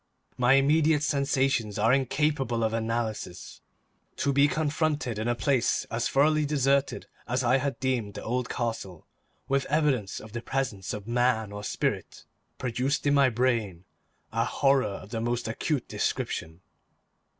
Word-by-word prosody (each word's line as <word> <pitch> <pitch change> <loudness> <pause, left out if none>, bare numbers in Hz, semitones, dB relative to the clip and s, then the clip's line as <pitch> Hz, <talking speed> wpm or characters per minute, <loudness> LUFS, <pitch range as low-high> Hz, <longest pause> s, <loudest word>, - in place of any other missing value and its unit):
My 125 +1 +4
immediate 150 +2 +4
sensations 135 -7 +1
are 115 +4 +3
incapable 135 -3 +1
of 110 0 0
analysis. 115 -5 -3 0.5
To 140 - 0
be 140 +1 +5
confronted 150 -6 -1
in 110 - -2
a 120 - +1
place 120 +2 +1
as 115 0 0
thoroughly 155 +2 +3
deserted 140 -1 +1 0.2
as 125 +1 0
I 125 +2 +4
had 135 0 -2
deemed 120 -6 -1
the - - -6
old 125 +1 -2
castle 115 -8 -4 0.4
with 140 0 0
evidence 140 -9 +1
of 110 - -12
the 120 +2 -5
presence 115 -10 -3
of 105 0 -9
man 120 -3 +1
or 105 0 -7
spirit, - - -3 0.3
produced 130 +4 -1
in 145 - +3
my 140 -2 +5
brain 115 -7 0 0.5
a 115 +1 +1
horror 135 +1 +2
of 100 0 -8
the 115 - -2
most 120 0 -1
acute 130 +4 -2
description. 80 +2 -3
125 Hz, 150 wpm, -27 LUFS, 110-140 Hz, 0.5 s, be